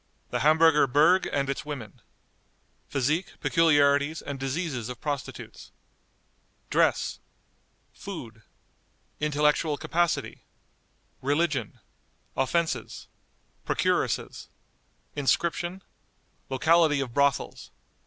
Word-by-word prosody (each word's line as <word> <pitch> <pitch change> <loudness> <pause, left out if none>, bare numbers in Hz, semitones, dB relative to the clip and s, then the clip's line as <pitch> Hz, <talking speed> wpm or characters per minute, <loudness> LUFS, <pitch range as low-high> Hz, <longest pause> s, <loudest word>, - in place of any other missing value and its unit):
The - - -1
Hamburger 155 -1 +5
Berg 155 +8 +4
and 140 -1 0
its 140 - -3
Women. 140 -9 -8 0.9
Physique, 150 +6 -1
Peculiarities, 145 -2 +3
and 140 -1 -5
Diseases 135 -3 -3
of 125 -2 -7
Prostitutes. 145 -3 -6 1.0
Dress. - - +1 0.7
Food. 120 - -8 0.8
Intellectual 150 0 +1
Capacity. 170 +1 -1 0.8
Religion. 145 +6 0 0.6
Offenses. 135 -4 -1 0.5
Procuresses. - - -1 0.7
Inscription. 170 +5 0 0.7
Locality 155 +2 +3
of 130 -4 -3
Brothels. 140 -1 0
145 Hz, 75 wpm, -27 LUFS, 135-165 Hz, 1.0 s, Hamburger